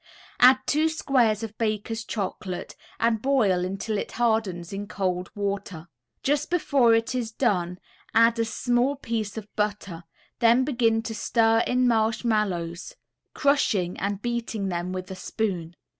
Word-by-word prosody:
Add 255 +1 +8
two 310 +2 +2
squares 245 -8 +1
of 220 -1 -7
Baker's 220 0 -2
Chocolate, 190 -4 -5 0.2
and 225 -2 +1
boil 220 -10 +2
until 195 +3 -2
it - - -6
hardens 220 -7 0
in 200 +1 -5
cold 185 -3 -2
water. 200 -5 -4 0.3
Just 290 +2 +1
before 275 -9 +3
it 225 +2 0
is 240 -3 -2
done 180 -8 0 0.4
add 230 0 +5
a 230 - +2
small 245 +4 +1
piece 225 -5 -4
of 215 -2 -6
butter, 205 -5 -2 0.4
then 235 +2 +5
begin 230 -5 +1
to 225 - -4
stir 225 +1 +2
in 250 0 +2
marshmallows, 215 -7 0 0.4
crushing 220 - +2
and 200 0 -3
beating 230 -4 -2
them 175 0 -3
with 185 0 -5
a - - -5
spoon. 180 -4 -3
220 Hz, 145 wpm, -25 LUFS, 195-235 Hz, 0.4 s, Add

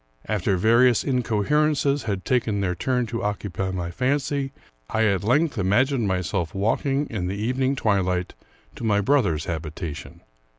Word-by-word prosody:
After 100 -2 0
various 115 +4 +4
incoherences 140 +4 +1
had 100 -3 -3
taken 115 -5 +1
their 95 -2 0
turn 125 +6 0
to 115 0 -4
occupy 100 -2 -3
my 90 -2 -3
fancy, 135 - -1 0.4
I 110 - +1
at 100 -3 +1
length 140 +3 +2
imagined 120 +5 +2
myself 90 -2 -2
walking, 135 +8 0
in 95 -6 -2
the 95 +2 -3
evening 130 +5 0
twilight, 95 -6 0 0.4
to - - -8
my 105 -2 +2
brother's 100 - +1
habitation. 80 -1 -6
110 Hz, 140 wpm, -24 LUFS, 95-130 Hz, 0.4 s, various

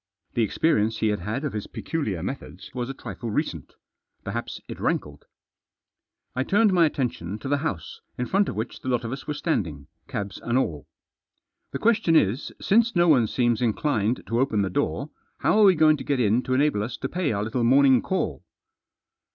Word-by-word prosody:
The 120 - +1
experience 110 -1 +1
he 110 +1 +1
had 105 - 0
had 105 - -3
of 150 - -2
his 105 -2 -4
peculiar 105 - -3
methods 135 +8 -7
was 125 0 -3
a - - -3
trifle 120 -2 -6
recent. 105 - -3 0.5
Perhaps - - -4
it - - -8
rankled. - - -2 1.1
I 130 - 0
turned 205 +6 +3
my 170 -3 +5
attention 115 - -3
to 110 - -7
the 145 +1 +1
house 110 - -4 0.2
in 125 - -1
front 195 +8 +2
of - - -5
which 110 +2 -4
the - - -8
lot 120 -2 +1
of 115 - -4
us 135 0 -6
were 150 - -2
standing, 85 - -2 0.2
cabs 100 -7 -5
and 120 +1 0
all. 80 - -1 0.4
" - - -54
The - - -3
question 215 -3 +3
is, 115 0 +2
since 230 +2 +3
no 175 0 +4
one 125 -7 +5
seems 120 0 +1
inclined 120 -1 0
to 115 +1 -1
open 110 -6 +2
the 95 - -2
door, 85 - -1 0.3
how 215 - +4
we 190 - +7
are - - -6
going 155 0 +5
to - - -7
get 140 -3 0
in 115 +1 +3
to 130 - 0
enable 140 -6 +2
us 110 +4 -4
to 135 - -3
pay 175 0 -1
our 100 -1 -1
little 115 +3 -1
morning 130 0 +5
call." 90 - -2
125 Hz, 200 wpm, -25 LUFS, 105-150 Hz, 1.1 s, we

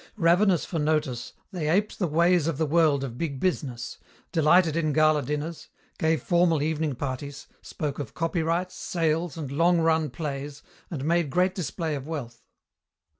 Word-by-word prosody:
Ravenous 180 0 +3
for 165 - -3
notice 150 -5 -1 0.2
they 160 -5 -2
aped 205 +6 +1
the 180 - +1
ways 170 +1 +3
of 165 -5 -1
the 160 - +1
world 155 -3 +3
of 125 -3 -6
big 145 -5 -3
business, 130 -9 -2 0.3
delighted 165 0 +4
in 155 -3 +1
gala 155 0 +4
dinners, 150 +4 -4 0.3
gave 160 -1 +1
formal 170 -4 +3
evening 155 -2 -1
parties, 140 +2 -5 0.2
spoke 145 -2 -4
of 140 -6 -6
copyrights, 165 +2 -1
sales, 165 -3 -1
and 145 -5 -5
long 170 +4 +3
run 160 -1 +2
plays, 145 -2 -5 0.3
and 145 -6 -4
made 170 -1 +2
great 180 +5 +2
display 170 -3 -3
of 140 -1 -5
wealth. 120 -8 -6
160 Hz, 160 wpm, -26 LUFS, 145-170 Hz, 0.3 s, delighted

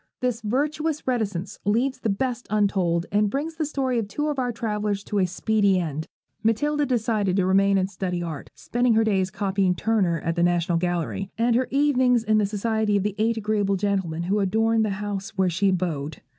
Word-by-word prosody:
This 250 -2 -1
virtuous 300 +7 -1
reticence 210 -6 -2
leaves 240 +6 +1
the 225 - -1
best 245 +4 -2
untold, 190 -5 +1
and 205 0 +2
brings 310 +7 -3
the 310 - -1
story 265 -4 0
of 215 - -3
two 295 +8 -2
of 290 -2 -2
our 250 -1 0
travellers 210 -3 -2
to 205 0 -2
a 185 - +2
speedy 200 +1 +2
end. 155 -2 -3 0.3
Matilda 290 +7 +1
decided 220 -6 0
to 190 -2 +2
remain 195 +1 +3
and 190 -1 +1
study 180 -2 -3
art, 160 -4 -6
spending 240 -1 +1
her 225 - +4
days 190 -4 +1
copying 195 -2 0
Turner 185 -4 +1
at 165 0 -2
the 170 - 0
National 175 -1 +2
Gallery, 170 - -2
and 230 +1 +2
her 255 +1 +1
evenings 260 -4 +3
in 215 -1 +3
the 205 - +2
society 215 0 0
of 195 - 0
the 210 -1 -1
eight 225 +1 +1
agreeable 205 -2 0
gentlemen 190 -4 -1
who 195 +4 0
adorned 220 +3 +2
the 215 - 0 0.2
house 200 0 -5
where 190 -2 +2
she 195 +4 +2
abode. 160 -5 -2
205 Hz, 200 wpm, -24 LUFS, 185-230 Hz, 0.3 s, her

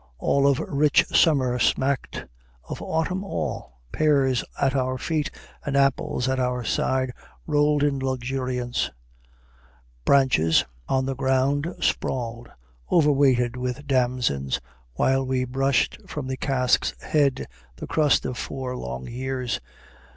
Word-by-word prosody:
All 140 0 +2
of 140 -2 +3
rich 145 +1 +3
summer 130 -6 +3
smacked, 135 +2 0 0.4
of - - -6
autumn 170 +4 -1
all: 60 - -5
Pears 135 - +2 0.2
at 135 -1 +2
our 130 -1 0
feet, 155 +1 -1 0.3
and 140 -1 -1
apples 135 -2 +1
at 130 0 0
our 125 -1 -1
side 130 +2 0 0.3
Rolled 150 -1 +2
in 140 -2 +1
luxuriance; 130 -1 -2 1.1
branches 100 - +4 0.2
on 130 0 +1
the 135 - -1
ground 135 +4 0
Sprawled, 120 -2 -2 0.4
overweighted 135 -6 +3
with 125 +3 -4
damsons; 125 - 0 0.4
while 135 - +2
we 130 -1 0
brushed 135 +1 +1
From 150 -3 -4
the 130 0 -3
cask's 125 -2 +1
head 140 -4 +1 0.3
the - - -7
crust 150 -3 +2
of 125 -1 -4
four 130 -2 -4
long 65 - -5
years. 130 0 -3
130 Hz, 120 wpm, -24 LUFS, 125-140 Hz, 1.1 s, branches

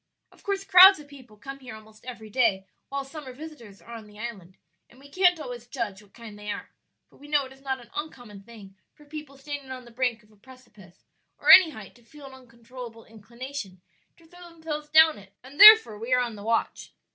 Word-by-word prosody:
"Of - - -23
course 395 -1 -3
crowds 385 0 +8
of 295 - -14
people 260 -7 -16
come 275 +5 -10
here 255 -4 -11
almost 215 +1 -18
every 230 -4 -10
day 205 -6 +1 0.2
while 275 0 -5
summer 270 -2 -10
visitors 255 -8 -13
are 235 - -12
on 225 -2 -10
the 210 0 -18
island, 200 -6 -9 0.3
and 250 - -21
we 280 - -16
can't 360 0 +2
always 245 -4 -9
judge 230 -7 -6
what 205 -1 -23
kind 220 -3 -12
they 210 0 -9
are; - - -7 0.4
but - - -22
we 290 - -15
know 295 -2 0
it 260 - -14
is 270 - -22
not 265 -1 -4
an 235 -1 -18
uncommon 245 -9 -8
thing 200 -3 -15 0.2
for 300 - -20
people 295 -2 -11
standing 285 -1 -8
on 255 -1 -9
the 235 - -16
brink 240 -1 -3
of 210 - -27
a - - -24
precipice 210 -6 -19 0.3
or - - +4
any 365 -3 +9
height 220 -9 -12
to 240 - -24
feel 290 +4 -16
an 270 - -12
uncontrollable 235 -2 -13
inclination 225 -1 -10 0.4
to 335 - -22
throw 355 +1 -15
themselves 315 -3 -7
down 315 -3 +5
it, 195 0 -19
and 270 +3 -15
therefore 425 - +8
we 230 +3 -7
are 250 - +4
on 240 -3 -4
the 205 - -11
watch. 225 +2 -3
255 Hz, 225 wpm, -25 LUFS, 220-290 Hz, 0.4 s, any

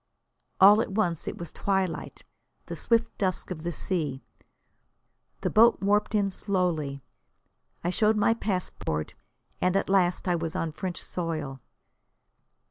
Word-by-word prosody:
All 205 +3 +8
at 200 - -4
once 180 -6 0
it - - -4
was 170 -2 -7
twilight, 190 -3 -2 0.4
the - - -6
swift 230 -1 +1
dusk 185 -1 -1
of 165 -4 -5
the 170 +1 -2
sea. 150 -5 -2 1.2
The - - -1
boat 230 +2 +6
warped 205 +2 +1
in 200 -2 +2
slowly. 170 -9 -1 0.8
I 175 - 0
showed 215 +3 +2
my 210 +2 +4
passport, 180 - -3 0.5
and 180 +1 +2
at - - -1
last 185 -1 +2
I 180 - +3
was 165 -1 -3
on 165 - -1
French 180 +3 -5
soil. 155 -7 -4
185 Hz, 135 wpm, -27 LUFS, 165-200 Hz, 1.2 s, All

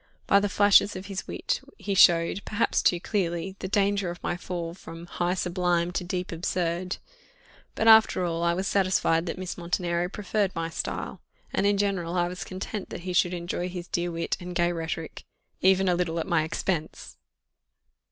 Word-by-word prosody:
By 200 - +5
the 205 0 0
flashes 205 0 +5
of 185 +1 -6
his 195 -1 -5
wit - - -2 0.2
he 200 - -3
showed, 175 0 +5
perhaps 215 +2 +1
too 175 - +3
clearly, 180 -1 -2
the - - -4
danger 200 -1 +1
of 175 - -8
my - - -1
fall 175 -1 -5
from 170 -2 -10
"high 175 +1 -1
sublime 175 -1 0
to 180 - -2
deep 180 0 -3
absurd;" 175 +2 -2 0.8
but, 225 - 0
after 220 -4 +6
all, 165 -1 -2
I 170 0 +2
was 190 +2 -2
satisfied 185 -3 +2
that - - -3
Miss 185 -1 -5
Montenero 175 0 -1
preferred 200 0 -1
my 165 0 -3
style, - - -4 0.3
and 200 - +2
in 205 0 +3
general 190 -4 -1
I 175 -1 +2
was 180 +3 -5
content 190 +2 -6
that - - -7
he 180 +1 -4
should 180 0 +2
enjoy 175 +1 -3
his 180 -1 -6
dear 175 0 -1
wit 165 0 -2
and 180 0 -7
gay 175 0 +2
rhetoric 165 -1 -5 0.4
even 190 0 +4
a 180 - +4
little 175 -1 -1
at 160 - -2
my 170 -4 +1
expense. 160 0 -3
180 Hz, 185 wpm, -27 LUFS, 170-190 Hz, 0.8 s, after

